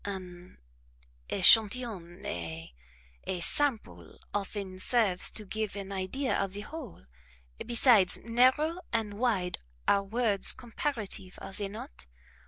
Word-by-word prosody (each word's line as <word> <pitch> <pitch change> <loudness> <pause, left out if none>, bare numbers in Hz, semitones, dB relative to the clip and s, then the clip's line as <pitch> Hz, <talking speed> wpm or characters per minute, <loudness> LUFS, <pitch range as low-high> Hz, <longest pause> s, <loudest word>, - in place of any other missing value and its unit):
An 185 -2 -8 0.7
echantillon 200 -3 +4
a 80 -5 -5 0.5
a 185 - -2
sample 270 +6 0 0.2
often 195 -2 -4
serves 205 -4 +2
to 215 - -6
give 215 0 -3
an 200 -1 -6
idea 195 +8 -2
of 195 -1 -1
the 205 - -3
whole; 260 - -9 0.6
besides, 235 -6 +4
narrow 260 +9 +3
and 210 -2 -2
wide 195 -8 0 0.3
are 200 - +4
words 210 -1 +2
comparative, 230 -6 -4
are 195 - -9
they 200 +1 -1
not? 65 - -10
205 Hz, 115 wpm, -30 LUFS, 185-235 Hz, 0.7 s, echantillon